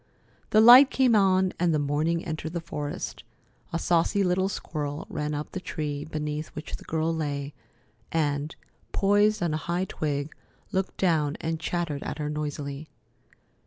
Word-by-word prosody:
The 215 - +5
light 250 +4 +10
came 255 -4 +3
on, 190 -2 +3
and 175 -1 +3
the 155 - +2
morning 150 +4 0
entered 160 0 -4
the 170 - -1
forest. 150 -3 -5 0.5
A 170 - 0
saucy 175 +4 +2
little 185 +1 +1
squirrel 145 -6 -4
ran 150 0 -2
up 150 +1 -5
the 185 - -4
tree 150 -5 -4
beneath 150 0 -4
which 150 +1 -6
the - - -14
girl 160 +1 0
lay, 145 -2 -3 0.6
and, 145 -1 -1 0.4
poised 205 +1 +3
on 165 -3 0
a - - 0
high 175 +3 -2
twig, 150 -4 -3 0.4
looked 190 0 -2
down 155 -6 +1
and 160 0 -2
chattered 160 -4 -2
at - - -5
her 150 -1 -3
noisily. 145 -1 -4
160 Hz, 160 wpm, -27 LUFS, 150-180 Hz, 0.6 s, light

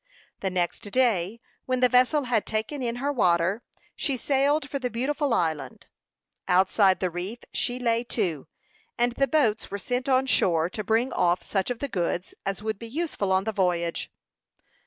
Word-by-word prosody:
The 190 - -1
next 180 -2 -1
day, 220 -3 +1 0.3
when 255 -1 +1
the 250 - +6
vessel 255 +4 +3
had 240 -4 +1
taken 225 +6 -2
in 235 -1 -1
her 280 +4 -1
water, 185 -2 +2 0.3
she 275 -3 -1
sailed 280 +3 +1
for 280 - -3
the 250 -2 -2
beautiful 275 +4 -1
island. 160 -8 -1 0.6
Outside 190 +1 +4
the 185 -2 -1
reef 180 +7 -5 0.2
she 245 0 0
lay 235 -1 +1
to, 180 - -2 0.5
and 240 +1 +2
the 275 +3 +1
boats 255 -9 +1
were 200 - -3
sent 250 +6 -2
on 260 0 +3
shore 170 -9 +2
to 215 - -4
bring 225 +5 +1
off 175 +1 +2
such 195 +1 -1
of 245 - -2
the 280 - -3
goods 180 -4 -2
as 195 +1 -3
would 215 -2 -2
be 230 - -7
useful 285 - -2
on 190 0 +3
the 220 - -1
voyage. 175 -4 0
225 Hz, 180 wpm, -26 LUFS, 185-255 Hz, 0.6 s, the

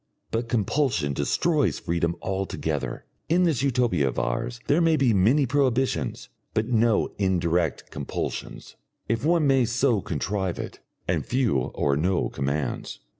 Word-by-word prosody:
But 115 +1 -2
compulsion 115 - +1
destroys 150 - +1
freedom 85 0 -1
altogether. 95 0 -3 0.2
In 175 +3 +4
this 160 -9 +2
Utopia 120 - +2
of 65 - -3
ours 115 - -2
there 150 +4 +3
may 165 -1 +4
be 130 -5 +3
many 115 +10 +4
prohibitions, 130 -1 0 0.3
but 110 - +2
no 115 -2 +2
indirect 85 -4 0
compulsions - - -5 0.3
if 115 +2 -1
one 165 0 +3
may 135 -2 +4
so 120 -2 +1
contrive 95 +3 -2
it - - -6 0.3
and - - 0
few 125 - +1
or 70 +2 0
no 90 +5 +1
commands. 70 +2 -3
115 Hz, 135 wpm, -25 LUFS, 90-135 Hz, 0.3 s, In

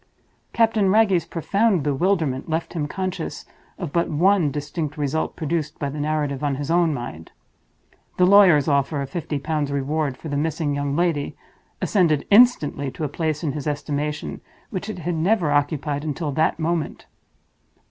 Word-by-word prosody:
Captain 225 -4 +2
Wragge's 200 -4 +3
profound 195 +1 +1
bewilderment 150 -1 0
left 160 +1 -2
him 155 -4 -2
conscious 185 +3 -4 0.3
of 170 -6 -5
but 170 0 +1
one 175 +1 +3
distinct 150 +2 -4
result 150 +2 -1
produced 155 -1 -2
by 140 - -2
the 145 +2 -6
narrative 145 -2 -1
on 145 -2 0
his 145 +3 -4
own 170 -1 +3
mind. 120 - -6 0.9
The 180 - +5
lawyer's 185 -7 +6
offer 140 0 +1
of 135 - -8
Fifty 160 -4 -3
Pounds 150 0 -2
Reward 140 0 -1
for 160 - -9
the 145 - -3
missing 155 0 -1
young 140 0 -1
lady 165 -4 0 0.5
ascended 165 -8 +2
instantly 200 - +4
to 155 - -7
a 150 - -1
place 155 +1 -2
in 150 - 0
his 145 +1 -5
estimation 150 0 -3 0.3
which 200 +1 -4
it 215 - -5
had 175 +1 -3
never 170 0 +1
occupied 145 0 0
until 155 0 -3
that 155 +3 +1
moment. 165 0 -2
155 Hz, 160 wpm, -23 LUFS, 145-175 Hz, 0.9 s, lawyer's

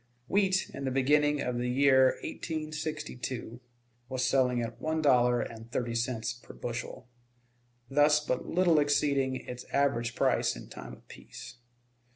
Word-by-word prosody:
Wheat, 190 -1 +1
in 140 - -5
the - - 0
beginning 145 +3 +2
of 125 -1 -2
the 125 0 -1
year 130 0 +4
1862, 155 -7 -5 0.5
was 130 -1 -1
selling 125 -1 +2
at 115 0 -7
one 160 0 -1
dollar 125 -5 +4
and 115 +1 -8
thirty 120 -1 -2
cents 115 -1 -2
per 120 - -14
bushel, 120 +1 -6 0.8
thus 150 +2 +4
but 135 -4 -3
little 175 -3 +3
exceeding 140 -2 +1
its 125 -1 -7
average 125 -4 0
price - - +1
in - - -10
time - - -9
of - - -16
peace. - - -11
130 Hz, 145 wpm, -30 LUFS, 125-150 Hz, 0.8 s, year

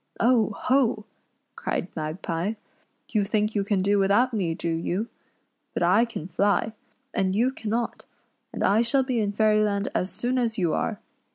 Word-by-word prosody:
" - - -28
Oh! 230 -2 +3
ho! 250 -5 +1 0.2
" - - -48
cried 180 - -3
Magpie, 165 +4 -2 0.3
" - - -42
you 210 -2 +3
think 210 +1 0
you 205 - +1
can 195 -2 0
do 200 +1 +3
without 205 +6 +3
me, 180 -7 0
do 170 - -2
you? 175 +7 -2 0.7
But - - 0
I 190 +7 +4
can 230 -8 -6
fly, 200 +4 +1 0.4
and 190 0 0
you 245 +5 +2
cannot; 230 -1 -3 0.5
and - - -3
I 205 +3 +4
shall 265 +3 +3
be 255 -2 -1
in 205 -2 0
Fairyland 210 -1 +2
as 180 - 0
soon 245 +6 -1
as 230 -2 -1
you 175 -5 +1
are. 215 -3 -1
210 Hz, 180 wpm, -25 LUFS, 190-230 Hz, 0.7 s, I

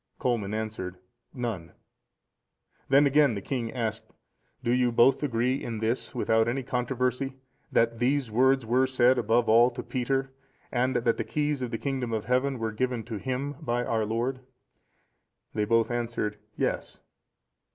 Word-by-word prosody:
Colman 115 -5 -1
answered, 110 -5 -4 0.3
"None." 110 - -4 1.2
Then 140 +2 +6
again 140 -3 +4
the - - -2
king 120 0 -3
asked, 115 -4 -3 0.5
"Do 120 - +1
you 125 0 +3
both 120 +3 +4
agree 125 -1 0
in 115 -2 -4
this, 115 +4 -2
without 110 -2 +2
any 130 +3 -1
controversy, 125 +1 -1 0.4
that 115 0 +2
these 130 -1 +1
words 130 +2 +3
were 125 +3 +3
said 130 -1 +3
above 115 +1 +2
all 115 +2 +6
to 120 - -7
Peter, 135 +1 -1 0.4
and 130 +1 +1
that 115 -1 +2
the - - -1
keys 150 -2 -1
of 125 - -2
the 115 - -3
kingdom 130 -3 -2
of 110 -2 -2
Heaven 130 +2 +1
were 115 -1 -2
given 125 +1 -1
to 115 -1 -5
him 130 +3 -3
by 120 +1 -1
our 110 -1 0
Lord?" 120 +4 -1 1.1
They 105 -1 0
both 115 +2 +2
answered, 115 -3 -2 0.2
"Yes." - - -2
120 Hz, 155 wpm, -28 LUFS, 115-130 Hz, 1.2 s, Then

